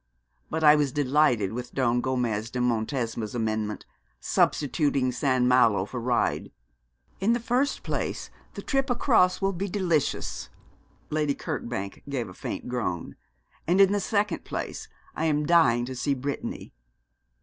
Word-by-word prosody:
But 160 0 -2
I 150 0 +8
was 145 -3 +1
delighted 130 -7 +2
with 125 +1 -6
Don 120 -2 +2
Gomez 120 -4 -1
de 125 - -6
Montesma's 115 -2 -1
amendment, 110 -2 -2 0.3
substituting 140 - +1
St. 130 0 +1
Malo 120 -6 +4
for 125 +4 -6
Ryde. 120 0 0 0.7
In 210 +5 +2
the 240 - 0
first 250 +4 0
place - - -3 0.2
the - - -6
trip 270 -1 0
across 220 -8 +3
will 195 0 +2
be 195 +3 -3
delicious' 175 -6 -1 0.6
Lady 150 -2 +1
Kirkbank 120 - -5
gave 125 -7 -3
a - - -10
faint - - -6
groan 110 -9 -3 0.5
'and 180 +3 +3
in 195 -1 +7
the 205 - +1
second 205 -2 0
place - - -5 0.3
I 160 - -1
am 150 -1 +1
dying 145 -8 +4
to 130 +1 -6
see 140 +3 0
Brittany.' 135 - -5
135 Hz, 145 wpm, -26 LUFS, 120-170 Hz, 0.7 s, I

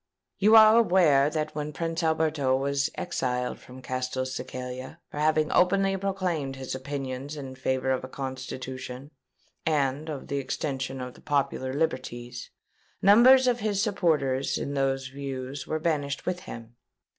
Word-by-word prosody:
"You 215 +3 +6
are 220 0 +9
aware 165 -10 +4
that 155 0 -2
when 150 0 -4
Prince 165 +3 -2
Alberto 155 -4 +1
was 140 +1 0
exiled 125 -7 -2
from 130 +1 -13
Castelcicala 130 +1 -4
for 145 - -5
having 155 0 +2
openly 195 +2 +3
proclaimed 185 -8 -2
his 130 -1 -5
opinions 135 +1 -5
in 135 -2 -6
favour 130 0 -1
of 130 - 0
a - - -5
Constitution 130 0 -6 0.5
and 150 0 0
of 145 -3 -5
the 140 - -1
extension 135 -1 -3
of 125 -1 -6
the - - -17
popular 140 -3 -1
liberties, 125 -5 -3 0.5
numbers 250 +6 +7
of 245 -1 +2
his 205 -2 0
supporters 155 - +1
in 140 - -3
those 135 -1 0
views 135 0 -6
were 155 - -1
banished 145 -3 -1
with 180 0 -1
him. 115 -5 -10
140 Hz, 145 wpm, -27 LUFS, 130-160 Hz, 0.5 s, are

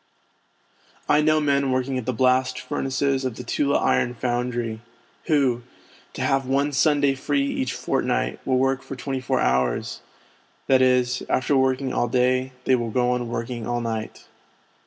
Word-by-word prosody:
I 150 - +4
know 155 0 +3
men 140 -2 +1
working 130 0 -1
at 115 - -8
the - - +2
blast 130 +1 +2
furnaces 135 +1 -1
of 130 -3 -3
the 125 - -7
Tula 140 +3 +1
Iron 120 0 +1
Foundry, 120 -2 -2 0.4
who, 135 -7 +2 0.5
to - - -4
have 135 -1 +1
one 140 +2 +1
Sunday 145 0 +3
free 275 - -1
each 275 -1 -2
fortnight, - - -1
will 130 -1 +1
work 135 +1 +1
for 135 - -8
twenty 135 +1 -4
four 130 0 0
hours; 65 -1 0 0.7
that 130 -1 +4
is, 125 -1 +2
after 130 +3 +1
working 130 0 +1
all 120 - +1
day, 130 +2 +1
they 130 - +3
will 120 -2 -2
go 125 +2 +1
on 125 -1 -2
working 115 -1 -4
all 120 0 -1
night. 115 -2 -5
130 Hz, 160 wpm, -23 LUFS, 125-135 Hz, 0.7 s, I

